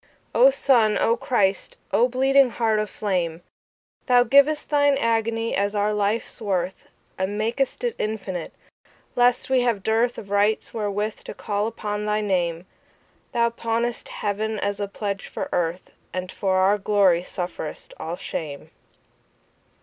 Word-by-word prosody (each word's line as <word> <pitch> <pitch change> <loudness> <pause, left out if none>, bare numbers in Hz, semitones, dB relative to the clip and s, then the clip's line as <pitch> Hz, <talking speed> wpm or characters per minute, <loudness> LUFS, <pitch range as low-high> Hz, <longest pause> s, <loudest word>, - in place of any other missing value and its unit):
O - - +7
Sun, 235 - +3
O 230 - +3
Christ, 195 -6 0
O 240 - +4
bleeding 265 +1 +4
Heart 225 -2 +1
of 215 -1 -2
flame! 175 -5 -2 0.6
Thou 245 -1 +6
giv'st 280 +4 +4
Thine 285 -1 +3
agony 225 -1 0
as 200 +1 0
our 205 +1 +1
life's 210 +3 -1
worth, 190 -3 -2 0.3
And 190 +2 -1
mak'st 235 - -1
it 480 -2 -1
infinite, 195 -5 -3 0.6
lest 245 +1 +2
we 260 -1 +4
have 230 -5 0
dearthOf 225 0 0
rights 205 +2 +1
wherewith 210 -1 -2
to - - -7
call 205 +1 -2
upon 210 -2 -4
thy 210 0 +1
Name; 175 -4 -1 0.7
Thou 235 -1 +2
pawnest 235 +1 -2
Heaven 215 +1 -2
as 200 0 -2
a 205 - -2
pledge 200 0 -4
for - - -5
Earth, 175 +1 -2 0.2
And 185 0 -4
for 190 -1 0
our 195 +2 +3
glory 195 -4 +3
sufferest 175 -4 -6
all 165 +2 -4
shame. 150 -5 -6
210 Hz, 140 wpm, -24 LUFS, 195-235 Hz, 0.7 s, O